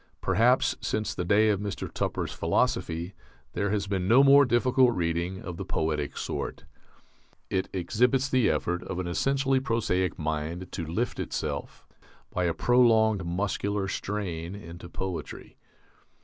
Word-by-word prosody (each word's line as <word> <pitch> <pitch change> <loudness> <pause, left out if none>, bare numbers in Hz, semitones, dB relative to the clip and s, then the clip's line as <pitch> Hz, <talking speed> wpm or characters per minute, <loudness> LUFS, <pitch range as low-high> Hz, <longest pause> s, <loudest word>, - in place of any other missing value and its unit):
Perhaps 115 +7 +3
since 110 0 -2
the 90 - -3
day 105 +5 +4
of 100 -3 +1
Mr. 100 -1 -4
Tupper's - - -3
"Philosophy" 85 +3 0 0.4
there 100 - -1
has 105 -1 0
been 95 -2 -2
no 125 +6 +6
more 140 +1 +7
difficult 125 +1 +3
reading 85 +2 -2
of 90 -2 -6
the - - -4
poetic 75 -2 -2
sort. - - -4 0.9
It 95 - 0
exhibits 125 +9 +1
the 130 -3 +3
effort 90 0 -1
of 95 - -5
an 90 - -2
essentially 135 +9 +1
prosaic 115 -8 0
mind 80 +3 -3
to 85 -4 -4
lift 110 +10 -2
itself, - - -4 0.5
by 90 - 0
a 85 - +1
prolonged 110 -5 +4
muscular 100 +2 -1
strain, 95 -4 -4
into 85 -3 -10
poetry. 95 -1 -6
100 Hz, 140 wpm, -27 LUFS, 85-115 Hz, 0.9 s, more